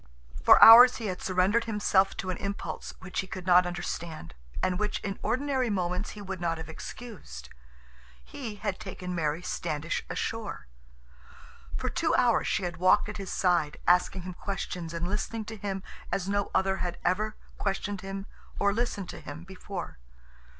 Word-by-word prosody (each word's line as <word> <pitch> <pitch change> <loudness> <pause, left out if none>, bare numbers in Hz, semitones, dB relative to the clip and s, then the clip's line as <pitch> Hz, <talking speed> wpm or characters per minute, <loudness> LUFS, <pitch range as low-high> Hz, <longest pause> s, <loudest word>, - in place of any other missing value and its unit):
For - - +8
hours 245 +3 +11
he 230 - -5
had 185 -3 -3
surrendered 190 +5 +2
himself 205 -3 +2
to 185 - -2
an 180 - -4
impulse 200 0 -5
which 185 0 -4
he 190 - -2
could 185 -1 -7
not 180 0 +6
understand, 170 - -5 0.3
and 180 -1 +1
which 210 0 -1
in 200 -1 -4
ordinary 265 -2 0
moments 180 0 -1
he 205 - -7
would 190 -2 -6
not 165 -1 0
have 160 - -7
excused. 160 - -9 0.8
He 235 -7 -7
had 205 -1 -3
taken 185 -3 -6
Mary 160 0 -1
Standish 165 -2 -2
ashore. 225 - -4 1.1
For - - -3
two - - +1
hours - - +3
she 200 - 0
had 175 -2 -3
walked 185 +4 +4
at 210 - -6
his 195 -2 -6
side, 175 -5 +1
asking 180 +1 +3
him 185 0 -6
questions 180 -3 -4
and 170 +1 -3
listening 215 +3 -3
to 220 - -7
him 195 -2 -4 0.3
as 190 -1 -1
no 200 0 0
other 190 0 +1
had 175 -2 -3
ever 210 +4 +1 0.2
questioned 195 0 -2
him 195 0 -5 0.3
or 200 0 +2
listened 210 -4 -2
to - - -7
him 145 +3 -8
before. 190 - -7
190 Hz, 170 wpm, -28 LUFS, 175-205 Hz, 1.1 s, hours